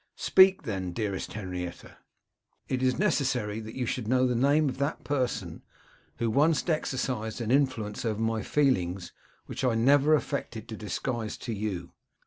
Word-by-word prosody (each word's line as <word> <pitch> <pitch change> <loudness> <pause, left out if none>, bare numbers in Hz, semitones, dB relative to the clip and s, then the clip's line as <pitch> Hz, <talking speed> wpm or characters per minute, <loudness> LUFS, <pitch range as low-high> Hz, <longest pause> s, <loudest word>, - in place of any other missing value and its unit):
'Speak, 190 -1 +5
then, 95 -8 -3
dearest 100 -2 -3
Henrietta.' 90 -4 -6 0.7
'It 130 -1 -1
is 130 -1 +2
necessary 130 - 0
that 110 0 -8
you 125 - -1
should 115 -1 -3
know 130 +2 +3
the 125 - +1
name 140 +5 +3
of 130 -1 -4
that 140 +3 -1
person 120 - -2 0.6
who 115 - 0
once 145 +8 +2
exercised 130 -8 -1
an 115 -1 -2
influence 130 -7 +1
over 110 -3 -1
my 115 0 0
feelings, 95 -9 0 0.3
which - - -6
I 125 -3 +2
never 140 +6 +5
affected 140 -7 -3
to 110 - -5
disguise 110 +2 -3
to 115 - -2
you. 100 -5 -4
120 Hz, 155 wpm, -28 LUFS, 105-135 Hz, 0.7 s, Speak